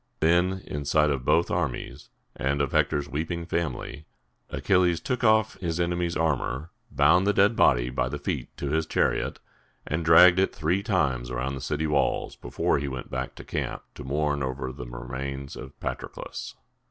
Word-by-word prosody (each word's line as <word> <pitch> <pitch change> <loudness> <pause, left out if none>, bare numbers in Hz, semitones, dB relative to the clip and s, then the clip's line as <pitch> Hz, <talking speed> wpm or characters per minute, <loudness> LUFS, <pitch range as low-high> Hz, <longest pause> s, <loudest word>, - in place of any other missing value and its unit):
Then, 90 +3 +2
in 75 0 -4
sight 75 +1 +3
of 65 -3 -2
both 85 - +3
armies - - -3 0.3
and 70 +2 -1
of 70 -2 0
Hector's 70 -1 +1
weeping 80 +4 -3
family, 85 -3 -3 0.4
Achilles 85 +5 +2
took 125 -1 -3
off 110 -1 +3
his 85 -2 -2
enemy's 85 0 0
armor, 75 -1 -1 0.2
bound 90 +3 +4
the 105 - +4
dead 100 +3 +4
body - - +3
by 65 -1 0
the 70 - -4
feet 70 - -3
to 70 - -3
his 80 0 0
chariot, - - 0 0.5
and 80 +3 -2
dragged 85 +3 +7
it 95 - +1
three 85 +5 +1
times 70 - 0
around 65 +2 -2
the 65 - -5
city 75 +4 -1
walls 75 -2 0
before - - 0
he 70 - -3
went 65 -2 -6
back 65 0 -4
to - - -10
camp - - -4
to - - -9
mourn 75 +2 0
over 65 -1 -3
the 60 -2 -8
remains 70 +3 -6
of 65 +1 -10
Patroclus. - - -6
75 Hz, 175 wpm, -26 LUFS, 65-85 Hz, 0.5 s, dragged